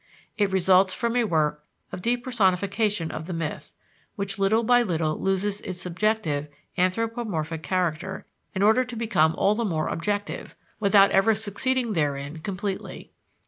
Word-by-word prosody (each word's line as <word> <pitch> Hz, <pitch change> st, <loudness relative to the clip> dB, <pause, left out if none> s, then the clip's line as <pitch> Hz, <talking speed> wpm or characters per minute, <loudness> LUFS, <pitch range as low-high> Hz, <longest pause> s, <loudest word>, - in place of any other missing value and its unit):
It 205 Hz, -2 st, +1 dB
results 190 Hz, 0 st, +4 dB
from 235 Hz, 0 st, -1 dB
a 245 Hz, -2 st, +3 dB
work 150 Hz, -5 st, 0 dB, 0.3 s
of 180 Hz, -, -6 dB
depersonification 210 Hz, -5 st, 0 dB
of 155 Hz, -, -6 dB
the 185 Hz, -, -4 dB
myth, 165 Hz, -2 st, -5 dB, 0.4 s
which 200 Hz, -2 st, -3 dB
little 215 Hz, +4 st, +3 dB
by 245 Hz, +2 st, +5 dB
little 160 Hz, -7 st, -1 dB
loses 195 Hz, +1 st, 0 dB
its 185 Hz, -1 st, -6 dB
subjective, 180 Hz, -5 st, -1 dB, 0.3 s
anthropomorphic 185 Hz, -4 st, -1 dB
character 180 Hz, +2 st, -2 dB, 0.3 s
in 190 Hz, -, +1 dB
order 220 Hz, +5 st, +5 dB
to 250 Hz, -1 st, -8 dB
become 185 Hz, -9 st, +2 dB
all 200 Hz, -, +3 dB
the 235 Hz, +2 st, -1 dB
more 160 Hz, -7 st, -1 dB
objective, 205 Hz, +4 st, -3 dB, 0.2 s
without 200 Hz, -1 st, +5 dB
ever 210 Hz, +3 st, +4 dB
succeeding 220 Hz, +3 st, -1 dB
therein 145 Hz, -1 st, -2 dB
completely. 190 Hz, +2 st, -5 dB
195 Hz, 140 wpm, -25 LUFS, 165-220 Hz, 0.4 s, by